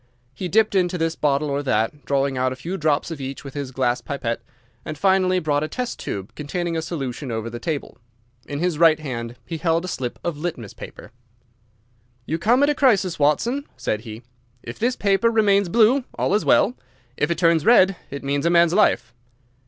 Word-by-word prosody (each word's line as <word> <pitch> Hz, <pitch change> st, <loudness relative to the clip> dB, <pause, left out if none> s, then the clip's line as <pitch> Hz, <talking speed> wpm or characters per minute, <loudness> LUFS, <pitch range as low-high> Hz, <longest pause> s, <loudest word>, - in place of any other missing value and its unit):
He 185 Hz, -, -4 dB
dipped 215 Hz, +4 st, +3 dB
into 180 Hz, -2 st, +1 dB
this 165 Hz, 0 st, -1 dB
bottle 145 Hz, 0 st, +1 dB
or 140 Hz, +1 st, 0 dB
that, 130 Hz, +2 st, -1 dB
drawing 140 Hz, -1 st, 0 dB
out 130 Hz, 0 st, 0 dB
a -, -, -4 dB
few 165 Hz, +9 st, -5 dB
drops 155 Hz, -2 st, 0 dB
of 155 Hz, -4 st, -6 dB
each 135 Hz, 0 st, -6 dB
with 140 Hz, -, -9 dB
his 140 Hz, -2 st, -4 dB
glass 125 Hz, -2 st, 0 dB
pipette, 120 Hz, -5 st, -3 dB, 0.4 s
and 155 Hz, -, -6 dB
finally 185 Hz, +1 st, +3 dB
brought 150 Hz, -4 st, 0 dB
a -, -, -1 dB
test 250 Hz, +7 st, -4 dB
tube 95 Hz, 0 st, -5 dB
containing 170 Hz, +3 st, -3 dB
a 160 Hz, -, -1 dB
solution 140 Hz, -5 st, -5 dB
over 110 Hz, -1 st, -3 dB
to 115 Hz, -, -5 dB
the 120 Hz, -, -6 dB
table. 150 Hz, +2 st, -4 dB, 0.5 s
In 145 Hz, -, -4 dB
his 170 Hz, -1 st, -1 dB
right 160 Hz, -2 st, +5 dB
hand 120 Hz, -5 st, -5 dB
he 165 Hz, -, -5 dB
held 165 Hz, +1 st, +1 dB
a -, -, -5 dB
slip 125 Hz, -8 st, -4 dB
of 170 Hz, -4 st, -2 dB
litmus 150 Hz, -, -5 dB
paper. -, -, -11 dB, 1.1 s
"You 160 Hz, -, -2 dB
come 240 Hz, +10 st, +3 dB
at 285 Hz, -, +4 dB
a -, -, +1 dB
crisis, 200 Hz, -, +2 dB
Watson," 235 Hz, -, +1 dB
said 105 Hz, -, -2 dB
he. 110 Hz, 0 st, -9 dB, 0.4 s
"If 115 Hz, -, -8 dB
this 245 Hz, +2 st, +1 dB
paper 200 Hz, +3 st, +2 dB
remains 200 Hz, -4 st, +3 dB
blue, 235 Hz, +7 st, +4 dB
all -, -, 0 dB
is 210 Hz, -, +2 dB
well. 235 Hz, -, +4 dB, 0.4 s
If 150 Hz, -, 0 dB
it 170 Hz, -, 0 dB
turns 165 Hz, -2 st, +3 dB
red, 195 Hz, -4 st, +5 dB
it 140 Hz, 0 st, -7 dB
means 140 Hz, +3 st, 0 dB
a -, -, +4 dB
man's 170 Hz, -1 st, +4 dB
life." 125 Hz, -, +2 dB
160 Hz, 205 wpm, -22 LUFS, 135-185 Hz, 1.1 s, right